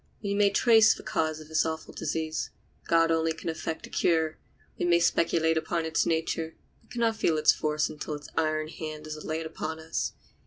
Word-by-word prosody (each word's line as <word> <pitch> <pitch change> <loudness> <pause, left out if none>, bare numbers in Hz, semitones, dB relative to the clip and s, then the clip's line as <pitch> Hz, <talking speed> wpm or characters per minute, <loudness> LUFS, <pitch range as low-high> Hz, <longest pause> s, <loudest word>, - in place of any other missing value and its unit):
We 200 -1 -1
may 200 0 +4
trace 220 +2 +5
the - - -11
cause 155 -1 -1
of 155 - -11
this 155 0 +2
awful 160 0 -4
disease; 160 -1 -2 0.4
God 165 0 +4
only 165 0 +2
can 165 - -5
effect 160 0 -4
a - - -12
cure. 160 -2 +1 0.4
We - - 0
may 170 -1 +4
speculate 165 -1 +2
upon 165 0 -2
its 160 0 +1
nature, 160 0 -1 0.3
but - - -29
can 240 - -4
not 225 -1 +2
feel 165 -7 +2
its 155 - +6
force 150 0 0
until 150 0 -5
its 145 0 -9
iron 155 -1 0
hand 155 -1 -7
is 155 0 -6
laid 160 +1 -3
upon 160 0 -5
us. 160 0 -3
160 Hz, 200 wpm, -28 LUFS, 155-165 Hz, 0.4 s, its